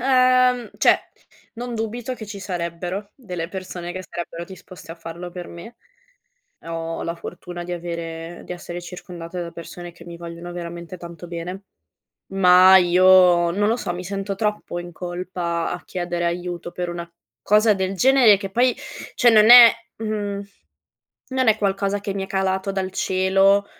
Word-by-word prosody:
ehm, 255 -2 +3
cioè, - - +5 0.6
non 240 +1 -5
dubito 230 +3 -3
che 220 - -8
ci 205 -1 -8
sarebbero 180 +2 -4
delle 180 -10 -6
persone 185 -2 -6
che 185 - -6
sarebbero 170 -1 -6
disposte 185 -2 -12
a - - -10
farlo 170 +1 -8
per 175 0 -7
me. 225 +8 -11 0.9
Ho 165 0 -4
la 170 0 -3
fortuna 175 +1 -8
di 180 - -7
avere 170 -1 -6
di - - -8
essere 175 0 -7
circondata 175 -1 -8
da 170 - -6
persone 175 +1 -9
che 170 0 -15
mi 170 -1 -9
vogliono 170 +1 -8
veramente 170 0 -7
tanto 170 0 -10
bene, 175 +3 -6 0.7
ma 185 0 +7
io, 180 -1 +5
non 205 +4 +1
lo 225 - +2
so, 175 -6 -3
mi 180 +1 -6
sento 195 +1 -4
troppo 210 -4 -2
in 175 0 -8
colpa 175 -1 -3
a 175 - -5
chiedere 175 -1 -3
aiuto 175 0 -3
per 180 -1 -4
una 170 0 -6 0.3
cosa 210 +1 +4
del 190 0 -2
genere 245 -2 +6
che 195 -1 -6
poi 245 +3 +3 0.4
cioè 240 - +5
non 215 +1 +6
è 240 -1 +11 0.3
mhmm, 205 -2 -3 0.9
non 260 -2 +1
è 215 0 +4
qualcosa 200 0 0
che 200 -1 -4
mi 195 - -3
è - - -8
calato 190 0 -1
dal 190 -1 -2
cielo 195 +2 +3
185 Hz, 165 wpm, -22 LUFS, 175-205 Hz, 0.9 s, è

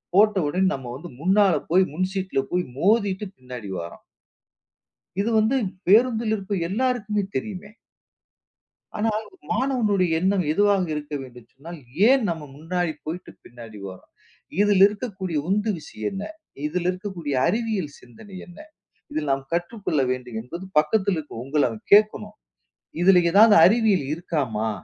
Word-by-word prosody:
போட்டவுடனே 190 -4 +3
நம்ம 130 -3 -6
வந்து 165 +6 -9
முன்னால 190 +3 +4 0.2
போய் 185 +3 +5
முன் 185 +4 0
சீட்ல 190 -6 -2
போய் 180 0 +1 0.2
மோதிட்டு 205 +1 +2
பின்னாடி 125 -5 -9
வார்றோம். 85 0 -9 1.2
இது 215 +3 0
வந்து 220 +5 +2 0.3
பேருந்தில் 225 +1 +4
இருக்கும் 195 -3 -3
எல்லாருக்குமே 215 -1 0
தெரியுமே. 205 -1 -5 1.3
ஆனால், 215 0 0 0.3
மாணவனுடைய 220 -9 +1
எண்ணம் 190 0 +1
எதுவாக 200 +1 +3
இருக்க 150 0 -6
வேண்டும்னு 125 -3 -14
சொன்னால், 165 +5 -10 0.3
ஏன் 265 +1 +5
நம்ம 165 -2 -4
முன்னாடி 170 +2 -2
போயிட்டு 170 +3 -6
பின்னாடி 115 -3 -12
வர்றோம்? 95 -1 -13 0.5
இதில் 205 -2 +4
இருக்கக்கூடிய 200 -5 -4
உந்து 210 +3 +1
விஷயம் 110 -8 -6
என்ன? 195 +1 -5 0.4
இதில் 175 +3 -1
இருக்கக்கூடிய 180 -6 -5
அறிவியல் 215 -9 -1
சிந்தனை 155 - -15
என்ன? 175 - -15 0.5
இதில் 150 -2 -2
நாம் 135 0 -2
கற்றுக்கொள்ள 175 -2 -1
வேண்டும் 125 -3 -4
என்பது 170 +11 -8
பக்கத்தில் 190 +5 +2
இருக்கும் 145 -6 -7
உங்கள 145 +2 +1
அவன் 110 -2 -8
கேட்கணும். 210 0 +3 0.7
இதில் 180 0 +6
ஏதாவது 210 +2 +7
அறிவியல் 210 - +3
இருக்காமா? 135 - -2
185 Hz, 130 wpm, -24 LUFS, 150-210 Hz, 1.3 s, ஏதாவது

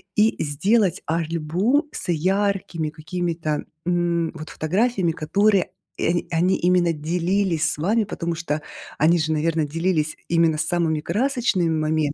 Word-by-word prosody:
и 220 +1 +3
сделать 185 +7 +1
альбом 170 - 0
с - - -7
яркими 185 -1 0
какими-то, 160 -1 -3 0.2
м, 175 -1 0
вот 155 -1 -8
фотографиями, 190 +2 0
которыми, 200 +5 +2 0.3
э, 175 +1 +1
они 175 +3 +2
именно 175 -1 +2
делились 170 +1 0
с - - -5
вами, 210 +9 +1
потому 170 -4 -3
что 155 -2 -3 0.4
они 165 +3 +4
же, 155 0 0
наверно, 160 0 +1
делились 160 0 -1
именно 165 -2 +3
самыми 160 0 0
красочными 220 - 0
моментами. 155 -2 0
170 Hz, 130 wpm, -23 LUFS, 155-190 Hz, 0.4 s, они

